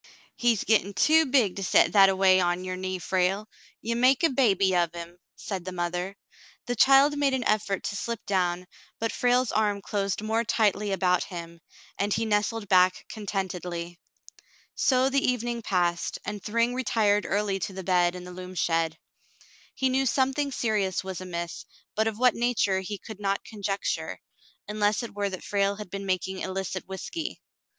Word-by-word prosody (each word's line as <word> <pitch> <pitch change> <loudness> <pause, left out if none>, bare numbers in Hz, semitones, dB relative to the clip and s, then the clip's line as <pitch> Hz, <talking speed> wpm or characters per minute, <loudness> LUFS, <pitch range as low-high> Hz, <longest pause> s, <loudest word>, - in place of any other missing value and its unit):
" - - -27
He's 235 -4 +1
gettin' 205 -2 +2
too 315 +9 +4
big 250 -9 +2
to 195 - -3
set - - +4
that 195 -2 +7
a 190 - +1
way 190 -1 +5
on 175 0 0
your 185 0 -4
knee, 185 0 -3
Frale. 190 +3 0 0.4
Ye 235 - -1
make 255 +5 +3
a 330 - +4
baby 195 -8 +3
of 170 -1 +1
him," 170 +1 -8 0.2
said 190 -4 -5
the 185 - -5
mother. 180 +2 -3 0.5
The 245 - -2
child 275 +4 +6
made 275 -2 +2
an 255 - -2
effort 210 -3 0
to - - -3
slip 230 +2 -4
down, 180 -2 0 0.3
but 225 0 -1
Frale's 245 0 +2
arm 210 -2 +1
closed 200 0 -2
more 225 +2 0
tightly 210 -2 +1
about 180 -2 +1
him, 170 -2 -8 0.4
and 205 +1 0
he 225 - 0
nestled 210 0 0
back 185 -1 +3
contentedly. 180 -4 -4 0.7
So 260 -1 +2
the 275 0 +1
evening 240 -1 -1
passed, 175 -4 0
and 205 0 -5
Thryng 230 +4 0
retired 215 -5 +1
early 200 -1 0
to 190 - -4
the 190 0 -6
bed 180 -1 +2
in 180 - -7
the 180 - -9
loom 185 0 -8
shed. 165 -1 0 0.8
He 265 - +1
knew 265 +1 +1
something 270 +3 +1
serious 210 -8 0
was 190 -1 -6
amiss, 170 -2 -5 0.3
but 220 +1 +1
of 220 -1 -2
what 250 -1 +4
nature 230 -5 +1
he 195 +2 -5
could 215 +1 -10
not 200 -1 -1
conjecture, 200 -2 -3 0.5
unless 210 +2 0
it 235 - -7
were 200 0 -1
that 185 -1 -7
Frale 200 0 0
had 205 -3 -9
been 195 0 -5
making 185 0 -1
illicit 190 -1 -4
whiskey. 310 - -5
200 Hz, 180 wpm, -27 LUFS, 185-225 Hz, 0.8 s, that